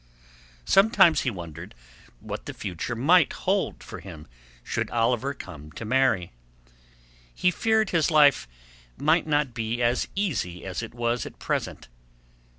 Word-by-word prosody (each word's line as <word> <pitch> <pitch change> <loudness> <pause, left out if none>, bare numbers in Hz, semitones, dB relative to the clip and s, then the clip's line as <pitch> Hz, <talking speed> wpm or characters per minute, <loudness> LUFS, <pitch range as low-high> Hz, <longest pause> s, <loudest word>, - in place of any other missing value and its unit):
Sometimes 195 -6 +5
he 135 - 0
wondered 85 -3 -9 0.5
what - - -7
the - - -6
future 95 +5 -4
might 155 +7 +4
hold - - -1
for - - -9
him 80 -4 -11 0.4
should - - -2
Oliver 120 +4 0
come 75 - -10
to 115 - -7
marry. 115 -7 +1 1.0
He 180 - +2
feared 220 +3 +1
his 165 -2 +2
life 145 - +5 0.5
might 155 +2 +2
not 145 -4 +1
be 115 +1 -3
as 120 +1 +1
easy 115 - -2
as 95 +2 -4
it 115 0 -8
was 120 0 -1
at - - -12
present. - - -3
120 Hz, 140 wpm, -26 LUFS, 95-155 Hz, 1.0 s, Sometimes